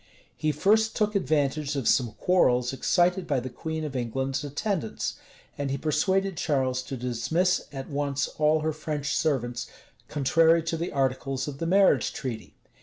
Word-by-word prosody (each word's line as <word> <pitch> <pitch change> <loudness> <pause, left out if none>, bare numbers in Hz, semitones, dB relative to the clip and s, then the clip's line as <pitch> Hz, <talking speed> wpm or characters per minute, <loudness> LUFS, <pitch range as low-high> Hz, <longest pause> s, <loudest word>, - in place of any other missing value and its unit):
[] - - -32
He 155 - 0
first 220 +9 +2
took 210 -1 +1
advantage 150 -5 0
of 135 -5 -1
some 120 -4 +2
quarrels 125 -9 +2
excited 180 +5 +1
by 140 -4 +1
the 125 +1 -6
queen 160 +5 -4
of 145 -3 -5
England's 130 +3 -2
attendants; 150 - -2 0.5
and 140 -1 -1
he 135 - -1
persuaded 190 +6 0
Charles 130 -4 0
to 130 +1 -6
dismiss 125 +10 0
at 135 -2 -6
once 145 -1 -1
all 155 0 +3
her 155 0 -1
French 150 -1 -3
servants, 120 -5 -1 0.4
contrary 160 +3 +3
to 165 +1 -2
the 170 +2 -3
articles 135 0 -1
of 140 -1 -6
the 165 - -2
marriage 185 - +4
treaty. 120 -4 -6
145 Hz, 165 wpm, -27 LUFS, 130-165 Hz, 0.5 s, marriage